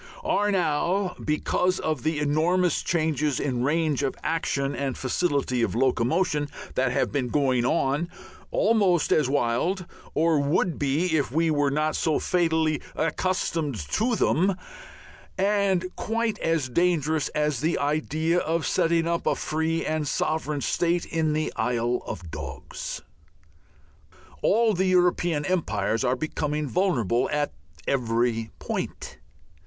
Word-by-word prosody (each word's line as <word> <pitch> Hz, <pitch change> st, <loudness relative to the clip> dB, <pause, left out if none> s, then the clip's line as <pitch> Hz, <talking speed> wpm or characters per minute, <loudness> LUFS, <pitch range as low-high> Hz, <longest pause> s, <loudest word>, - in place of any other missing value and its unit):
are 205 Hz, +1 st, +1 dB
now, 180 Hz, +2 st, 0 dB
because 180 Hz, +4 st, +1 dB
of 155 Hz, -5 st, -2 dB
the 155 Hz, +4 st, 0 dB
enormous 160 Hz, +4 st, +2 dB
changes 155 Hz, -4 st, 0 dB
in 125 Hz, -4 st, -1 dB
range 150 Hz, 0 st, +1 dB
of 135 Hz, -2 st, -1 dB
action 140 Hz, -4 st, -1 dB
and 135 Hz, -2 st, -2 dB
facility 135 Hz, -3 st, 0 dB
of 115 Hz, -, 0 dB
locomotion 145 Hz, +5 st, +1 dB, 0.2 s
that 130 Hz, -1 st, +1 dB
have -, -, 0 dB
been 135 Hz, -4 st, -1 dB
going 130 Hz, -2 st, +1 dB
on, 145 Hz, +3 st, +1 dB, 0.4 s
almost 210 Hz, -, +2 dB
as 150 Hz, -4 st, +3 dB
wild 145 Hz, +8 st, 0 dB, 0.3 s
or 160 Hz, -1 st, +3 dB
would 150 Hz, +4 st, +1 dB
be 155 Hz, +5 st, +1 dB
if 145 Hz, -5 st, 0 dB
we 160 Hz, +3 st, +2 dB
were 145 Hz, -2 st, +2 dB
not 155 Hz, +2 st, 0 dB
so 160 Hz, -2 st, +1 dB
fatally 160 Hz, -3 st, +1 dB
accustomed 165 Hz, -3 st, -1 dB
to 215 Hz, -, 0 dB
them 190 Hz, -1 st, +2 dB, 0.8 s
and 195 Hz, -2 st, +2 dB
quite 225 Hz, 0 st, -1 dB
as 165 Hz, -5 st, 0 dB
dangerous, 160 Hz, 0 st, +1 dB
as 150 Hz, -3 st, +1 dB
the 160 Hz, +5 st, 0 dB
idea 155 Hz, +3 st, 0 dB
of 165 Hz, 0 st, -1 dB
setting 165 Hz, 0 st, +2 dB
up 170 Hz, 0 st, -1 dB
a -, -, +3 dB
free 160 Hz, +1 st, -1 dB
and 155 Hz, -1 st, -1 dB
sovereign 150 Hz, -1 st, -1 dB
state 175 Hz, +3 st, 0 dB
in 160 Hz, -2 st, 0 dB
the 155 Hz, 0 st, -1 dB
Isle 120 Hz, +1 st, 0 dB
of 90 Hz, -6 st, -6 dB
Dogs. -, -, -6 dB, 1.4 s
All 225 Hz, +1 st, +3 dB
the 190 Hz, 0 st, +1 dB
European 175 Hz, -4 st, +2 dB
empires 115 Hz, -, 0 dB
are 125 Hz, 0 st, +2 dB
becoming 150 Hz, +1 st, -2 dB
vulnerable 130 Hz, -, +1 dB
at 145 Hz, 0 st, 0 dB, 0.4 s
every 115 Hz, -3 st, 0 dB
point. -, -, -5 dB
155 Hz, 130 wpm, -26 LUFS, 135-175 Hz, 1.4 s, as